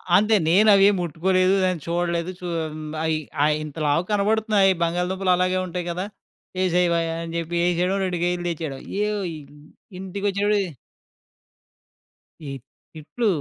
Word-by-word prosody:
అంతే. 215 +3 +4
నేనవేం 200 +2 +6
ముట్టుకోలేదు. 185 +3 +1
దాన్ని 180 -4 0
చూడలేదు. 170 +1 -1
చూ 180 - -8 0.3
హ్మ్, 155 0 -7 0.2
అయి 160 -1 +1 0.3
అయ్యి 150 0 +2
ఇంత 150 -1 -8
లావుగ 150 +4 +2
కనబడుతున్నాయి. 210 -1 +3
బంగాళదుంపలు 180 +3 0
అలాగే 185 +1 +1
ఉంటాయి 175 0 -4
గదా! 180 +3 -3 0.5
యేసేయవయ్యా 170 -2 +1
అని 165 0 -7
జెప్పి 170 +1 -3
యేసేయడం. 180 +2 +1
2 180 -1 -2
కేజీలు 175 0 -1
తెచ్చేయడం. 155 -5 -4 0.2
య్యోయి 205 -5 -2 0.6
ఇంటికొచ్చేప్పుడే 200 +2 0 1.9
ఈ - - -5 0.4
తిట్లూ 185 +9 -3
180 Hz, 120 wpm, -23 LUFS, 170-195 Hz, 1.9 s, నేనవేం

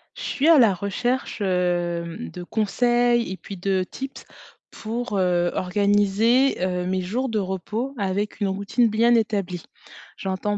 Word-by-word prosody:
Je - - -9
suis 285 +3 0
à 330 - +8
la 225 -7 +6
recherche, 225 +6 -2
hem, 175 +1 -1
de 180 - -7
conseils 240 +3 +1
et 190 - -5
puis 200 - -9
de 190 +1 0
tips 270 0 -7 0.5
pour, 230 0 -4
heu, 175 -2 +2
organiser, 205 +7 +2
heu, 180 -1 -1
mes 185 +1 -1
jours 240 +9 -2
de 220 -2 0
repos 205 +7 -3
avec 200 0 -2
une 205 - +1
routine 200 +5 +1
bien 230 +3 +3
établie. 200 -6 -1 0.5
J'entends 195 +2 -2
200 Hz, 150 wpm, -23 LUFS, 185-235 Hz, 0.5 s, à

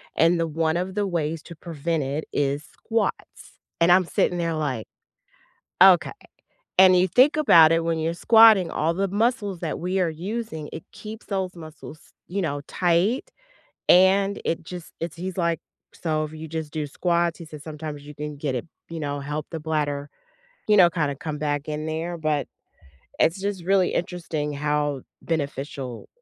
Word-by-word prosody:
and 170 +1 +4
the 165 - +1
one 160 +1 0
of 185 +1 -3
the 205 -1 0
ways 165 -3 -2
to 170 - -11
prevent 160 -1 -3
it 140 +4 -3
is 145 +1 0
squats. 225 +7 -4 0.2
And 170 - +5
I'm 185 0 +5
sitting 175 +1 0
there, 165 -1 -1
like, 140 -8 -2 1.0
"Okay." 180 -2 +6 0.7
And 185 -1 +8
you 180 +1 +4
think 255 - +4
about 165 - +7
it 165 0 +2
when 165 -1 0
you're 165 +1 -1
squatting, 220 -1 +6
all 165 +2 0
the 195 +3 0
muscles 205 -2 0
that 160 - -3
we 185 +2 -1
are 175 -3 +2
using, 180 -2 -5
it 160 - -7
keeps 220 +1 -9
those 190 -3 -2
muscles, 155 -1 -11 0.3
you 195 +3 -3
know, 145 -5 -2
tight 185 - +1 0.6
and 195 +2 +5
it 165 - -1
just 175 0 -9
it's 165 0 -4
he's, 185 +1 -5
like, 170 -3 +1 0.3
"So, 155 -2 -1
if 155 - -10
you 155 +1 -8
just 160 -1 -5
do 155 -1 -3
squats," 170 +2 0
he 170 - -8
says, 150 -2 -11
"sometimes 150 -2 -7
you 150 - -9
can 150 -1 -6
get 140 -2 -2
it 125 - -3 0.2
you 165 -1 -6
know, 145 -1 -3
help 150 +1 -4
the 165 - -4
bladder, 150 -2 -2 0.6
you 210 - +5
know, 180 -3 +8
kinda 150 -5 -1
come 150 +1 -5
back 145 0 -2
in 155 +1 -3
there," 165 +2 -3
but 150 -4 0 0.7
it's 165 +4 +3
just 200 -3 -3
really 190 -1 +3
interesting 160 -4 -3
how 145 -1 -1 0.2
beneficial 140 -5 -4
165 Hz, 175 wpm, -24 LUFS, 150-180 Hz, 1.0 s, And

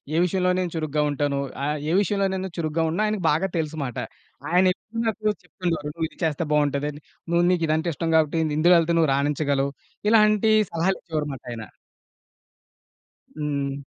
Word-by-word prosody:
ఏ - - +2
విషయంలో 180 0 +1
నేను 180 -2 -2
చురుగ్గా 155 -1 0
ఉంటాను, 145 -1 -1 0.3
ఆహ్, 150 +1 0
ఏ - - +1
విషయంలో 200 0 +1
నేను 190 0 -3
చురుగ్గా 160 0 0
ఉండనో, 180 +7 0
ఆయనకి 210 -4 -1
బాగా 190 +6 +1
తెలుసుమాట. 150 -6 -3 0.5
ఆయనెప్పుడూ 185 +5 +1
నాకు 220 0 -2 0.2
చెప్తుoడేవారు, 165 -6 -3
నువ్విది 160 -1 -4
చేస్తే 160 0 0
బావుంటదని, 145 0 0 0.3
"నువ్వు 170 0 +3
నీకీదంటే 165 -1 +1
ఇష్టం 165 +3 -3
కాబట్టి 160 0 +3 0.2
ఇందులో 175 +3 +5
వెళ్తే 170 0 +2
నువ్వు 160 -4 +3
రాణించగలవు". 140 -1 0 0.4
ఇలాంటి 215 0 +4 0.2
సలహాలు 175 +4 0
ఇచ్చేవారుమాట 150 -6 -4
ఆయన. 115 -2 -6 1.7
హ్మ్. 140 -2 -2
160 Hz, 140 wpm, -24 LUFS, 145-180 Hz, 1.7 s, ఇందులో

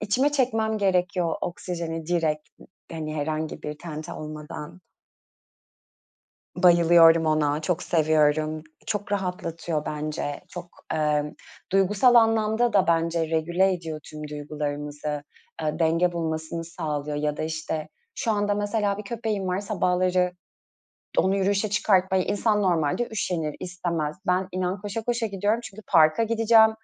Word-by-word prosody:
içime 255 +8 +1
çekmem 225 -5 +1
gerekiyor, 180 -3 +1 1.6
hani, 155 -1 -4
herhangi 155 +1 -3
bir 150 0 -5
tente 155 -2 -7
olmadan. 150 +2 -8 1.8
Bayılıyorum 170 -2 +6
ona. 155 -1 +1
Çok 175 +2 -1
seviyorum. 155 -1 +2 0.2
Çok 205 -1 -3
rahatlatıyor 170 -5 -2
bence. 150 -1 -3
Çok, 175 -1 -8 0.2
ımm, 150 -1 0 0.4
duygusal 195 +6 +4
anlamda 225 0 +3
da 195 -4 +4
bence 165 -1 +1
regüle 170 +4 +2
ediyor 160 -3 -5
tüm 150 0 -8
duygularımızı. 150 0 -4 0.4
Iıı, 155 +1 -2
denge 165 +2 +3
bulmasını 160 0 -3
sağlıyor 150 -3 -4
ya 150 0 -1
da, - - -2
işte, 160 0 -3 0.3
şu 225 - 0
anda 205 -1 +1
mesela 205 -1 0
bir 210 - -6
köpeğim 215 -3 -3
var. 185 +1 0
Sabahları 180 -2 +1 0.9
onu 190 +1 +3
yürüyüşe 200 +1 +1
çıkartmaya 190 -2 +3
insan 210 0 +1
normalde 175 +5 +1
üşenir, 170 -8 -2
istemez. 170 -4 -3
Ben 185 +1 +1
inan 185 +1 -2
koşa 205 +2 -4
koşa 235 -1 0
gidiyorum 205 +2 0
çünkü 215 -1 -10
parka 160 +2 +5
gideceğim, 225 0 +5
175 Hz, 120 wpm, -25 LUFS, 155-205 Hz, 1.8 s, Bayılıyorum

